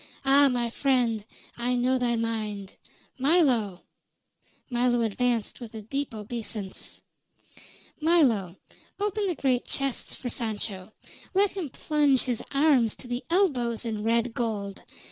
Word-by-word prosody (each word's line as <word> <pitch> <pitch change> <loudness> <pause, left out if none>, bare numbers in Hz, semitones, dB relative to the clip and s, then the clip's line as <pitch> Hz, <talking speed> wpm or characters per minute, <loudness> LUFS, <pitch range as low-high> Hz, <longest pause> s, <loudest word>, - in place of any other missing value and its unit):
"Ah! 280 +1 +7
my 240 -2 -1
friend, 245 -5 +1 0.3
I 245 +1 0
know 255 +1 +2
thy 240 -1 +1
mind. 215 -4 -3 0.5
Milo!" 255 - +2 0.8
Milo 240 -1 +2
advanced 230 +1 0
with 235 -2 -9
a 215 - -6
deep 275 +2 -3
obeisance. 215 -2 -6 1.0
"Milo, 255 - +3 0.4
open 415 0 0
the 360 - -1
great 255 -3 +1
chests 275 -2 -1
for 255 - -6
Sancho. 215 -4 -4 0.4
Let 400 +1 +4
him 370 -7 -4
plunge 290 -1 +2
his 245 -3 -1
arms 275 -6 +3
to 255 - -12
the 245 +1 -3
elbows 255 - +1
in 215 -2 -3
red 230 +1 +1
gold. 210 -4 -3
245 Hz, 125 wpm, -27 LUFS, 220-275 Hz, 1.0 s, Ah